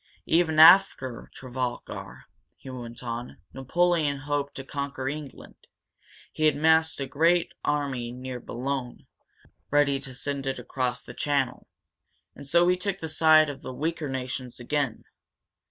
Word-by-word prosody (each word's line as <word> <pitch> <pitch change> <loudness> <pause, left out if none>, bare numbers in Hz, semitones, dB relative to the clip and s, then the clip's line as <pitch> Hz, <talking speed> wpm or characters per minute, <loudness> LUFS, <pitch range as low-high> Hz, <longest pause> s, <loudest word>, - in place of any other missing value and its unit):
"Even 160 -1 +2
after 160 -7 +6
Trafalgar," 130 -2 -6 0.3
he 130 - -11
went 120 -1 -8
on, 120 0 -5 0.2
"Napoleon 155 +2 +1
hoped 145 0 -2
to 135 - -6
conquer 140 -1 -4
England. 145 -1 -8 0.6
He 155 - -1
had 155 -2 +4
massed 160 +1 +3
a 135 - -2
great 165 +5 +2
army 135 -5 -1
near 125 0 -6
Boulogne, 125 +1 -4 0.6
ready 145 -1 +3
to 130 -2 -8
send 140 +1 -4
it 135 - -1
across 125 -1 -3
the - - -10
channel. 140 -3 -1 0.7
And 140 - -11
so 170 +4 +4
we 180 +1 +3
took 195 +1 -2
the 160 - -5
side 155 0 +5
of 140 -2 -6
the - - -7
weaker 160 0 -2
nations 130 -1 -5
again. 135 -1 -2
140 Hz, 140 wpm, -26 LUFS, 130-155 Hz, 0.7 s, after